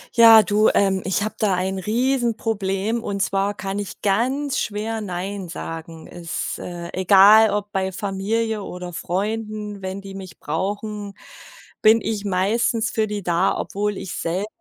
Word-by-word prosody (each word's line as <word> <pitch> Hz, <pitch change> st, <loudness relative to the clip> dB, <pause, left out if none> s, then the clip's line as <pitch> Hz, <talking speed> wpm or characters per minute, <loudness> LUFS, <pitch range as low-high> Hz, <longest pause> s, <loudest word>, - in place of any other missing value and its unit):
Ja 225 Hz, -2 st, +9 dB
du, 210 Hz, +2 st, +3 dB
ähm, 195 Hz, -1 st, +2 dB
ich 195 Hz, +1 st, 0 dB
habe 215 Hz, -, -4 dB
da 205 Hz, -3 st, +2 dB
ein 190 Hz, +1 st, -1 dB
Riesenproblem. 225 Hz, -2 st, 0 dB
Und 200 Hz, -3 st, -3 dB
zwar 195 Hz, +1 st, 0 dB
kann 195 Hz, 0 st, -4 dB
ich 205 Hz, -, -7 dB
ganz 260 Hz, +7 st, 0 dB
schwer 220 Hz, +2 st, -3 dB
„Nein“ 190 Hz, -1 st, -4 dB
sagen. 165 Hz, -1 st, -7 dB
Es 175 Hz, -2 st, -5 dB
äh, 175 Hz, -1 st, -7 dB
egal 200 Hz, +4 st, +7 dB
ob 205 Hz, 0 st, -2 dB
bei 190 Hz, -1 st, -1 dB
Familie 210 Hz, +3 st, -2 dB
oder 180 Hz, -1 st, -7 dB
Freunden, 210 Hz, +4 st, -3 dB
wenn 190 Hz, +1 st, -5 dB
die 195 Hz, 0 st, -9 dB
mich 190 Hz, -2 st, -9 dB
brauchen, 205 Hz, +5 st, -4 dB, 0.7 s
bin 220 Hz, +1 st, +6 dB
ich 210 Hz, -1 st, -3 dB
meistens 220 Hz, +4 st, +1 dB
für 220 Hz, -1 st, 0 dB
die 205 Hz, -1 st, -4 dB
da, 170 Hz, -1 st, +1 dB
obwohl 205 Hz, +1 st, -2 dB
ich 185 Hz, -, -6 dB
selber, 180 Hz, +5 st, -2 dB
200 Hz, 150 wpm, -22 LUFS, 190-220 Hz, 0.7 s, Ja